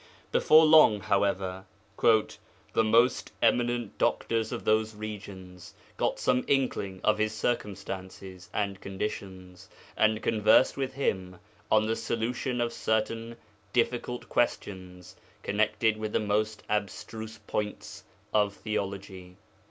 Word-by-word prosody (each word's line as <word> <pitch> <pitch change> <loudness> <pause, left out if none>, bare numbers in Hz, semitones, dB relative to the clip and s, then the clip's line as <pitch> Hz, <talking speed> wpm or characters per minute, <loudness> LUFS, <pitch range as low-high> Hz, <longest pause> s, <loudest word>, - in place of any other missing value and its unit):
Before 155 +1 +6
long, 155 -9 +7
however, 95 -2 0 0.4
'the 110 0 +1
most 115 +3 +3
eminent 120 -3 +1
doctors 115 -1 0
of - - -5
those 110 0 +2
regions 95 -4 -9 0.2
got - - 0
some 125 0 +1
inkling 100 -9 0
of 110 0 +2
his 110 0 0
circumstances 95 -4 -4
and 100 -2 -2
conditions, 95 -2 -6 0.3
and 110 0 +2
conversed 110 +3 +4
with 135 -1 -3
him 95 -9 -2 0.3
on 110 0 +4
the 110 +1 0
solution 120 +3 -2
of 120 0 -1
certain 115 +1 -1 0.4
difficult 125 0 -1
questions 95 -6 -2 0.3
connected 110 +1 +1
with 110 0 -4
the - - +2
most 105 0 -1
abstruse 110 +2 -4
points 105 -1 -5 0.3
of 105 -1 +2
theology. 95 -3 -5
105 Hz, 115 wpm, -28 LUFS, 95-115 Hz, 0.4 s, long